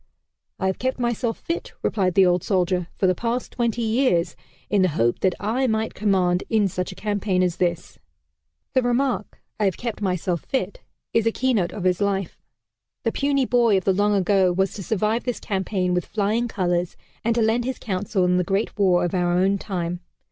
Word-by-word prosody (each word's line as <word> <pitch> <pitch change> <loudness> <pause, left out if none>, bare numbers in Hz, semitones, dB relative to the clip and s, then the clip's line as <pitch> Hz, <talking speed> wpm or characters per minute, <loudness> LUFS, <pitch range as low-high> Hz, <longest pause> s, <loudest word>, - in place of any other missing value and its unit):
"I 190 - -2
have 190 0 0
kept 260 +1 -1
myself 240 -1 -1
fit," 335 - -4
replied 185 -4 +1
the 195 - +6
old 180 -1 +2
soldier, 180 -2 0
"for - - 0
the 185 - +4
past 235 +6 -3
twenty 235 -1 -1
years, 220 - +1 0.3
in 205 - +2
the 185 - +4
hope 120 -6 +1
that 185 -2 +1
I 235 +6 0
might 220 -1 -1
command 185 -3 +1
in 215 -3 +3
such 180 0 -3
a - - -10
campaign 205 -3 0
as 180 -1 0
this." 170 -2 -2 0.7
The 260 - +4
remark, 245 -2 -1 0.2
"I 210 - +2
have 190 - 0
kept 235 -3 -5
myself 180 -3 -1
fit," 205 -7 -3 0.3
is 230 -1 +2
a - - +3
keynote 225 -8 +1
of 205 - -6
his 185 +1 +1
life. 195 -3 -1 0.6
The 230 - +1
puny 275 0 +1
boy 235 -5 +3
of 190 - -1
the 195 - +3
long 205 +2 +2
ago 190 -1 +3
was 190 +2 0
to 205 - -7
survive 215 +4 0
this 245 -2 -3
campaign 190 -2 -1
with 180 -1 -1
flying 215 +3 0
colors, 180 -5 -1 0.3
and 230 0 +1
to 235 - +2
lend 230 +2 +1
his 260 0 -2
counsel 190 -2 -1
in 180 0 +3
the 180 - +2
Great 195 +4 -2
War 180 -3 +4
of 175 - -3
our 175 -1 +1
own 195 +2 +2
time. 175 -3 -3
200 Hz, 200 wpm, -23 LUFS, 180-230 Hz, 0.7 s, the